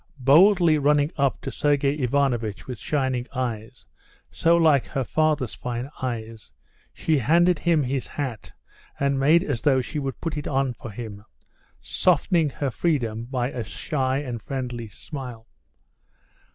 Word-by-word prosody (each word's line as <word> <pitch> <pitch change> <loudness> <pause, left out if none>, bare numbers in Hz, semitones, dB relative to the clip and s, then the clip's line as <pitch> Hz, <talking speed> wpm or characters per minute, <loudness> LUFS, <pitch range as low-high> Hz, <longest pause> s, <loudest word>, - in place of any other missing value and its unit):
Boldly 160 +4 +5
running 145 +1 +3
up 140 -2 0
to 135 - -5
Sergey 145 -1 +1
Ivanovitch 125 -5 0
with 125 -5 -7
shining 130 -3 -1
eyes, 120 -1 -4 0.5
so 170 +1 +3
like 155 -6 +4
her 135 -3 -2
father's 150 -3 0
fine 125 +3 -5
eyes, 115 - -5 0.4
she 155 -3 0
handed 170 +6 +3
him 165 -4 +2
his 130 0 -2
hat 130 -7 -5 0.5
and 140 -1 +1
made 155 +6 +5
as 135 -10 -2
though 135 0 +3
she 150 +4 -3
would 135 -2 -4
put 160 -2 -3
it 150 - -4
on 135 -2 0
for 120 - -9
him, 105 -1 -8 0.6
softening 165 -4 +2
her 140 0 -3
freedom 120 -8 -1
by 125 0 -2
a 120 - -4
shy 130 +3 -2
and 125 -5 -4
friendly 120 -3 -5
smile. 125 - -8
135 Hz, 145 wpm, -24 LUFS, 120-150 Hz, 0.6 s, Boldly